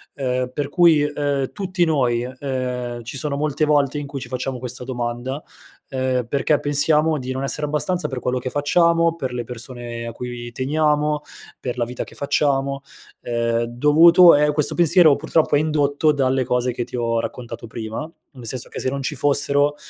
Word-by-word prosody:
Ehm, 125 -2 -2
per 145 +1 -2
cui, 170 -3 +5
e 150 - -1
ehm, 140 -2 -1
tutti 185 -3 0
noi, 125 -6 +1
e 130 +1 -7
ehm, 125 -3 -3
ci 115 +4 -7
sono 140 +1 -2
molte 150 0 -1
volte 145 -1 +2
in 145 - -4
cui 140 -1 -6
ci 125 - -8
facciamo 130 +1 -4
questa 125 0 -4
domanda, 125 +2 -4 0.5
ehm, 130 -2 -1
perché 140 +4 +1
pensiamo 150 +2 +2
di 130 -1 -5
non 130 +1 -3
essere 150 +2 -1
abbastanza 175 +5 -1
per 130 -2 -4
quello 125 +1 -1
che 130 +1 -4
facciamo, 165 +3 +2
per 130 -6 -4
le 120 -1 -3
persone 120 0 -6
a 115 - -5
cui 120 0 -7
teniamo, 150 +3 0 0.4
per 125 -1 -4
la 120 - 0
vita 125 +1 -5
che - - -14
facciamo, 140 -1 0 0.4
ehm, 115 -1 0
dovuto 155 +8 +6
è 150 +1 +3
questo 150 -1 +1
pensiero 170 -3 +5
purtroppo 155 +1 +1
è - - +4
indotto 150 0 +2
dalle 135 -2 +1
cose 125 0 0
che 120 - -3
ti 125 +1 -7
ho 115 -1 0
raccontato 120 -1 -7
prima, 110 +7 -6 0.2
nel 125 -4 -12
senso 125 +1 -3
che - - -7
se - - 0
non 140 +1 -3
ci 150 - -3
fossero 145 +1 +2
135 Hz, 190 wpm, -21 LUFS, 125-150 Hz, 0.5 s, dovuto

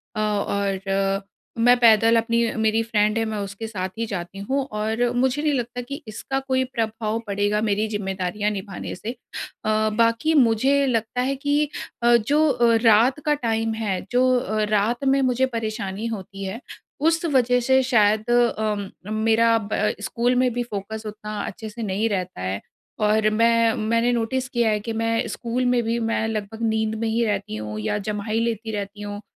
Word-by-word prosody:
अ, - - -2
और 200 -2 0 0.9
मैं 245 0 +7
पैदल, 230 -1 +6
अपनी 230 0 +2 0.2
मेरी 220 +1 +2
फ्रेंड 215 -1 +1
है, 225 - +1
मैं 220 -1 -3
उसके 200 +3 -6
साथ 190 -4 -4
ही 230 - -1
जाती 190 -2 -6
हूँ, 265 +7 -1
और 220 +3 0
मुझे 260 +3 +1
नहीं 300 -1 +1
लगता 245 -1 -2
कि 280 +5 -7
इसका 250 +5 -3
कोई 260 -1 0
प्रभाव 225 -3 -2
पड़ेगा, 205 +1 0
मेरी 215 0 +1
ज़िम्मेदारियाँ 200 0 -2
निभाने 195 -2 -6
से। 220 +5 -5 0.5
अ, 215 0 +2
बाकी 230 +8 +2
मुझे 270 +1 +3
लगता 230 0 -1
है 270 +2 0
कि 290 +2 0 0.3
अ, 240 0 +6
जो 295 +8 +2
अ, 235 -3 +3
रात 230 +5 +5
का 300 - +3
टाइम 225 0 0
है, 205 -5 -2
जो 250 +1 +3
अ, 215 -2 -1
रात 230 +6 0
में 270 +1 +3
मुझे 260 0 +2
परेशानी 215 -2 -3
होती 195 0 -9
है, 195 +4 -4 0.4
उस 330 +3 +2
वजह 250 -5 +3
से 265 +2 +4
शायद 215 -3 +2
अम, 220 -4 +1 0.2
मेरा 225 +1 +3
अब 210 -2 -2
अ, 210 - +1
स्कूल 240 +3 0
में 255 0 +3
भी 245 +1 -1
फ़ोकस 220 0 -6
उतना 210 0 -6
अच्छे 220 -2 -7
से 230 +2 -7
नहीं 205 +2 0
रहता 185 - -3
है। 95 +2 -3 0.4
और 215 0 +3
मैं 230 +1 +3
मैंने 230 +2 +1
नोटिस 245 +3 -1
किया 235 -2 +1
है 210 -1 +1
कि 225 +2 -5
मैं 230 0 0
स्कूल 240 +2 -2
में 245 -1 +3
भी 230 +1 0
मैं 225 -1 0
लगभग 220 0 -4
नींद 220 0 0
में 230 - -1
ही 230 +1 +1
रहती 200 - -2
हूँ, 105 0 -5
या 110 - -1
जम्हाई 210 +2 -2
लेती 225 -1 -2
रहती 205 0 -5
हूँ, 205 0 -6
225 Hz, 180 wpm, -23 LUFS, 210-240 Hz, 0.9 s, मैं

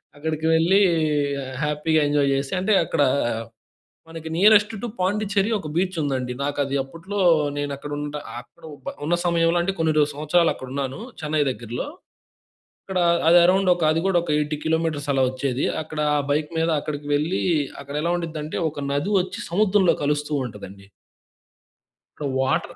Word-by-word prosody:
అక్కడికి 155 +1 -3
వెళ్ళి 175 +5 +4 0.8
హ్యాపీగా 150 +1 +1
ఎంజాయ్ 145 -1 +2
చేసి 135 +3 -3
అంటే, 205 +3 +1
అక్కడ - - -1 1.1
మనకి 165 -1 -8
నియరెస్ట్ 210 +4 +5
టూ 240 - -2
పాండిచెర్రీ 205 +2 0
ఒక 190 -7 -5
బీచ్ 185 0 0
ఉందండి. 130 -3 -2
నాకు 145 +1 -2
అది 140 0 -4
అప్పట్లో 165 +9 -6 0.4
నేను 145 0 -2
అక్కడ 145 +1 -8
ఉంటా 150 0 -4 0.2
అక్కడ 160 +7 -20 0.2
బ - - -3
ఉన్న 165 +4 +1
సమయంలో 170 0 +2 0.2
కొన్ని 160 -1 +2 0.2
సంవత్సరాలు 155 +4 +2
అక్కడ 130 - -9
ఉన్నాను 135 +3 -3 0.2
చెన్నై 155 0 -1
దగ్గరలో. 120 - -5 1.0
అక్కడ 190 -1 -2 0.3
అది 175 +1 +8
అరౌండ్ 190 +2 +3
ఒక 170 -2 -2
అది 160 +1 +1
కూడా 190 -2 +3
ఒక 170 - -5
80 150 0 -1
కిలోమీటర్స్ 160 -3 -1
అలా 135 -1 +2
వచ్చేది. 130 0 -2 0.2
అక్కడ 155 0 -6 0.2
ఆ - - +2
బైక్ 150 +1 +1
మీద 165 - +1
అక్కడికి 145 0 -5
వెళ్లి, 155 +6 0 0.4
అక్కడ 140 +1 -9
ఎలా 170 +1 0
ఉండిద్దంటే 155 -2 -5
ఒక 145 -1 -6
నది 145 +8 -1
వచ్చి 180 - -4
సముద్రంలో 195 0 +3
కలుస్తూ 150 +1 -1
ఉంటదండి. 100 -3 -11 1.3
ఇప్పుడు 145 -2 -3
వాటర్ 130 - -1
155 Hz, 155 wpm, -23 LUFS, 145-175 Hz, 1.3 s, అది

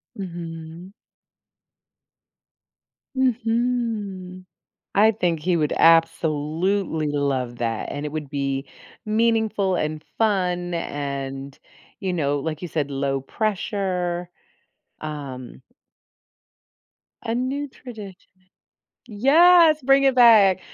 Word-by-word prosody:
Mhm. 170 -1 -8 2.2
Mhm. 225 -7 -1 0.5
I 215 +2 +6
think 175 -6 -1
he 175 +2 +1
would 150 -2 0
absolutely 165 +1 +2
love 135 -4 -1
that, 115 -1 -2
and 145 +1 -4
it 150 - -6
would 150 -3 -5
be 140 -1 -2 0.4
meaningful, 220 -3 +1
and 155 -1 -3
fun 180 -5 0
and, 140 -3 -5 0.4
you 190 -2 -2
know, 145 -4 0
like 155 +2 -4
you 175 - -4
said, 145 -3 -2
low 135 0 -1
pressure, 180 - -2 0.7
um 135 -5 -7 1.6
a 230 0 -2
new 270 +4 -2
tradition. 215 -8 -11 0.8
Yes, 310 +7 +5
bring 275 +1 +4
it 270 -1 +3
back. 220 -6 +6
180 Hz, 95 wpm, -23 LUFS, 150-220 Hz, 2.2 s, I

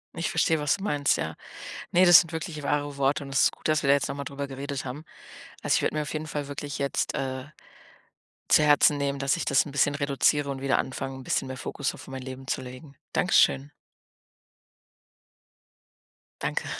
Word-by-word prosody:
Ich 165 - -2
verstehe, 160 -1 +2
was 150 +4 +1
du 195 - -9
meinst, 145 -7 +1
ja. - - -3 0.6
Ne, 180 +2 +5
das 175 -2 +10
sind 165 -1 -3
wirklich 160 -2 -5
wahre 145 0 -1
Worte 140 +2 +1
und 135 - -9
es 135 - +3
ist - - +4
gut, - - -6
dass 155 - +2
wir 140 - -2
da 140 - +7
jetzt 140 -2 0
noch - - -3
mal 140 0 -5
drüber 140 +1 -5
geredet 140 0 -5
haben. 135 +5 -7 0.6
Also, - - +2
ich - - +2
würde - - 0
mir 155 - 0
auf 150 - -5
jeden 155 0 -3
Fall 145 -2 -4
wirklich 145 0 -6
jetzt, 140 0 -1
äh, 130 -2 -3 1.0
zu 155 - +6
Herzen 145 0 +5
nehmen, 140 -1 -1
dass 135 -1 +1
ich - - -3
das 135 - +3
'n 145 - -8
bisschen 145 +1 +2
reduziere 140 0 +1
und 135 -1 -4
wieder 135 -1 +2
anfange, 135 0 -3
'n 130 - -9
bisschen 135 - -1
mehr 130 - -5
Fokus 140 - -3
auf - - -12
mein 130 -1 -6
Leben 130 0 -8
zu - - -1
legen. 130 +3 -11 0.2
Danke - - +1
schön. 70 +1 +4 2.7
Danke. - - -2
140 Hz, 210 wpm, -26 LUFS, 135-150 Hz, 2.7 s, das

